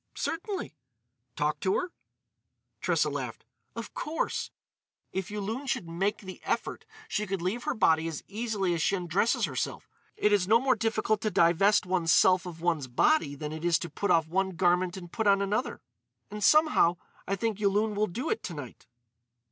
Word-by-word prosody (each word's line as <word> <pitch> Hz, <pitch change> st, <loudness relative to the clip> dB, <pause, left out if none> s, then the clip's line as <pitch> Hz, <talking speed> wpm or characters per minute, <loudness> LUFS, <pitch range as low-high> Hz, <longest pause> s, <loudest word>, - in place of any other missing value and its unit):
"Certainly." 365 Hz, -, -3 dB, 0.6 s
"Talk 150 Hz, +1 st, 0 dB
to 190 Hz, -, +1 dB
her?" 360 Hz, -1 st, -3 dB, 0.9 s
Tressa -, -, +2 dB
laughed: -, -, -5 dB, 0.3 s
"Of -, -, -7 dB
course. 315 Hz, +2 st, -2 dB, 0.6 s
If 190 Hz, +1 st, -3 dB
Yulun 215 Hz, +6 st, -4 dB
should 180 Hz, -, -2 dB
make 190 Hz, +5 st, -1 dB
the 190 Hz, -2 st, -9 dB
effort -, -, -2 dB, 0.2 s
she 210 Hz, 0 st, -2 dB
could 195 Hz, 0 st, -2 dB
leave 190 Hz, +8 st, -2 dB
her -, -, -1 dB
body 160 Hz, -5 st, +3 dB
as 160 Hz, -2 st, -5 dB
easily 205 Hz, -4 st, -1 dB
as 165 Hz, -, -1 dB
she 195 Hz, -, +2 dB
undresses 180 Hz, +5 st, +1 dB
herself. -, -, -4 dB, 0.3 s
It 210 Hz, -, +3 dB
is 190 Hz, -3 st, +2 dB
no 225 Hz, +3 st, +5 dB
more 260 Hz, +1 st, +3 dB
difficult 220 Hz, -2 st, 0 dB
to 215 Hz, -, 0 dB
divest 185 Hz, +3 st, +4 dB
one's 180 Hz, -3 st, +1 dB
self 185 Hz, 0 st, +4 dB
of 165 Hz, -2 st, -9 dB
one's 165 Hz, -6 st, 0 dB
body 145 Hz, -, +2 dB
than 150 Hz, +1 st, -5 dB
it 160 Hz, +1 st, -7 dB
is 170 Hz, -2 st, +3 dB
to 170 Hz, -, -6 dB
put 200 Hz, +7 st, -2 dB
off 165 Hz, -2 st, +4 dB
one 190 Hz, +2 st, -1 dB
garment 180 Hz, +1 st, +2 dB
and 175 Hz, -2 st, -9 dB
put 220 Hz, -2 st, -1 dB
on 200 Hz, -1 st, +5 dB
another.... 205 Hz, +5 st, -2 dB, 0.5 s
And, 210 Hz, 0 st, -5 dB
somehow, 305 Hz, -, +5 dB, 0.3 s
I 195 Hz, -, 0 dB
think 215 Hz, +1 st, -2 dB
Yulun 210 Hz, +1 st, +1 dB
will 210 Hz, +1 st, +1 dB
do 245 Hz, -, -3 dB
it 445 Hz, -, -1 dB
to 175 Hz, -, -6 dB
night." 140 Hz, -5 st, -9 dB
195 Hz, 180 wpm, -29 LUFS, 170-215 Hz, 0.9 s, no